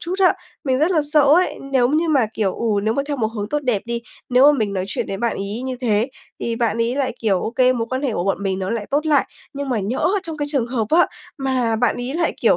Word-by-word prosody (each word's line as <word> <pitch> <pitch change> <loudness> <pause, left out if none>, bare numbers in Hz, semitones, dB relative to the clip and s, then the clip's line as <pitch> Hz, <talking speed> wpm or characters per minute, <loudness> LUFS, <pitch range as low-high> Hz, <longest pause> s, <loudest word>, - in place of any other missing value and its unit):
chút 350 +2 -3
á, 370 0 +5 0.3
mình 260 -2 +1
rất 310 +5 +2
là 335 -4 +3
sợ 300 -2 +6
ấy, 310 +6 +3
nếu 245 -2 +4
như 315 +4 +1
mà, 270 -7 +3
kiểu, 200 -4 0
ừ, 215 -3 0
nếu 220 +2 +1
mà 280 - 0
theo 290 - -1
một 230 -4 +1
hướng 205 -1 -3
tốt 295 - 0
đẹp 240 -6 0
đi, 235 0 -3 0.3
nếu 260 +4 +6
mà 290 - -1
mình 205 -2 0
nói 185 -1 -1
chuyện - - -3
với 195 - -3
bạn 235 +3 0
ấy 205 +5 -4
như 260 -1 -3
thế 225 0 +1 0.3
thì 230 -1 -2
bạn 230 -1 0
ấy 235 +3 0
lại, 275 -2 0
kiểu, 200 -5 +1
ô - - -2
kê, 255 +1 +3
mối 230 -2 -2
quan 260 +1 -2
hệ 265 -5 0
của 175 - -2
bọn 195 0 -1
mình 190 -1 -1
nó 190 0 -3
lại 225 -3 -2
tốt 300 +3 +1
lại, 290 -3 +3 0.3
nhưng 280 -1 -4
mà 245 - 0
nhỡ 215 - 0
trong 325 -3 -6
cái 290 0 -2
trường 270 -6 0
hợp 235 -3 -1
á, 345 +2 +5 0.3
mà 255 -4 0
bạn 235 0 +1
ấy 245 +3 -4
lại, 335 +1 0
kiểu, - - +4
245 Hz, 285 wpm, -21 LUFS, 220-285 Hz, 0.3 s, sợ